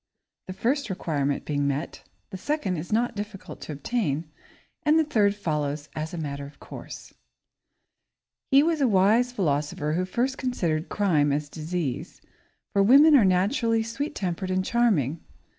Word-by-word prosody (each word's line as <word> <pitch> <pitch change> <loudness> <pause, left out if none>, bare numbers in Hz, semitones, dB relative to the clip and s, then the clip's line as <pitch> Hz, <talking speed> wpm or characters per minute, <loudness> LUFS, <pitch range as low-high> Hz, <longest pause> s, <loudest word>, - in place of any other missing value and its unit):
The 185 - -5
first 255 +5 -1
requirement 145 -6 -2
being 145 -1 0
met, 140 +3 -3 0.3
the 190 - -5
second 285 -8 -1
is 155 +6 -6
not 235 +2 +1
difficult 205 -1 -7
to - - -7
obtain, 155 - -2 0.5
and 305 +1 +3
the 320 - +4
third 210 -9 +2
follows 150 -6 -2
as 155 +1 -4
a 175 - -6
matter 140 -3 -4
of 145 - -17
course. - - -10
[Sidenote: - - -36 1.4
Nagging] - - +7
He 280 - +7
was 320 -2 +1
a 270 - +4
wise 220 +4 +3
philosopher 150 -6 -1
who 180 +3 0
first 250 +8 -1
considered 170 -11 -1
crime 155 -8 +2
as 145 +1 -2
disease, 160 -4 -4 0.5
for 200 - +3
women 280 +9 +7
are 255 - +6
naturally 225 +5 +2
sweet 275 +7 -4
tempered 185 0 -3
and 185 0 0
charming. 170 - +1
185 Hz, 160 wpm, -26 LUFS, 155-235 Hz, 1.4 s, Nagging